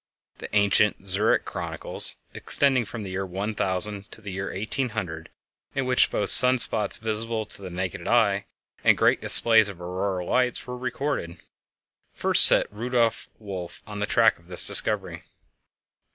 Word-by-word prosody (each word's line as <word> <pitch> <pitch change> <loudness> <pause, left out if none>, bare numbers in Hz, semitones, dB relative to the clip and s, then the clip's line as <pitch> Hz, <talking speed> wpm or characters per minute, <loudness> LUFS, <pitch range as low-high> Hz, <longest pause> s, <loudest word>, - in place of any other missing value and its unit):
The - - -9
ancient 100 0 +1
"Zurich 100 +4 0
Chronicles," - - 0 0.2
extending 135 -4 +1
from 110 0 -9
the 95 - -8
year 95 +1 -4
1000 100 +1 -3
to - - -13
the 105 -3 -10
year 95 +1 -6
1800, 105 -6 -5 0.5
in 135 -1 -2
which 125 0 +2
both 100 - +2
sun 125 +1 +10
spots 110 -4 +3
visible 110 0 -4
to - - -7
the 95 - -9
naked 90 -1 -6
eye 100 -4 0 0.4
and - - +3
great - - +1
displays 110 -3 +4
of 100 - -11
the 90 - -13
auroral 90 0 -5
lights 125 -1 -2
were 125 -1 -8
recorded, 130 -8 -5 0.8
first - - +2
set - - +6
Rudolf 115 +1 -2
Wolf 95 -5 -10
on 105 -1 -9
the 105 - -3
track 115 -5 +1
of 85 - -25
this 90 -1 -2
discovery. - - 0
105 Hz, 155 wpm, -23 LUFS, 95-115 Hz, 0.8 s, sun